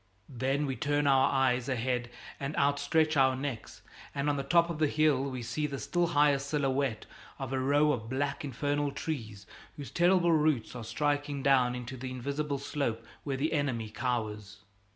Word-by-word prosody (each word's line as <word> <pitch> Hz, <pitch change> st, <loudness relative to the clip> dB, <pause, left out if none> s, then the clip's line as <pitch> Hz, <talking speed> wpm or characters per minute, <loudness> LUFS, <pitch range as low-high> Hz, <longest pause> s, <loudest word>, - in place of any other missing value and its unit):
Then 135 Hz, +3 st, -1 dB
we 135 Hz, -2 st, -2 dB
turn 145 Hz, +3 st, 0 dB
our 135 Hz, -1 st, +4 dB
eyes 130 Hz, -2 st, +1 dB
ahead 125 Hz, -1 st, -1 dB, 0.3 s
and 140 Hz, +1 st, -4 dB
outstretch 145 Hz, +3 st, +2 dB
our 130 Hz, -2 st, +4 dB
necks, 130 Hz, -4 st, -6 dB, 0.3 s
and 140 Hz, +1 st, +1 dB
on -, -, -1 dB
the 140 Hz, -, -1 dB
top 170 Hz, +4 st, +3 dB
of 160 Hz, -, -5 dB
the 155 Hz, -, +3 dB
hill 150 Hz, -3 st, +2 dB
we 130 Hz, -3 st, -4 dB
see 150 Hz, +6 st, -2 dB
the 140 Hz, -1 st, -5 dB
still 175 Hz, +5 st, 0 dB
higher 145 Hz, -3 st, +3 dB
silhouette 135 Hz, -4 st, -1 dB, 0.3 s
of 135 Hz, -2 st, -5 dB
a 130 Hz, -, 0 dB
row 145 Hz, +3 st, +3 dB
of 115 Hz, -5 st, -3 dB
black 140 Hz, +3 st, -2 dB
infernal 145 Hz, +2 st, -1 dB
trees 115 Hz, -9 st, -5 dB, 0.3 s
whose 145 Hz, -2 st, -7 dB
terrible 175 Hz, 0 st, +4 dB
roots 150 Hz, -8 st, +1 dB
are 120 Hz, -, -6 dB
striking 145 Hz, +4 st, -1 dB
down 130 Hz, -3 st, +4 dB
into 125 Hz, +1 st, -6 dB
the 130 Hz, +1 st, -5 dB
invisible 140 Hz, +3 st, -3 dB
slope 135 Hz, -5 st, -3 dB, 0.2 s
where 135 Hz, -2 st, -2 dB
the 155 Hz, +5 st, 0 dB
enemy 125 Hz, -8 st, -1 dB
cowers. 105 Hz, -4 st, -3 dB
140 Hz, 175 wpm, -30 LUFS, 125-145 Hz, 0.3 s, our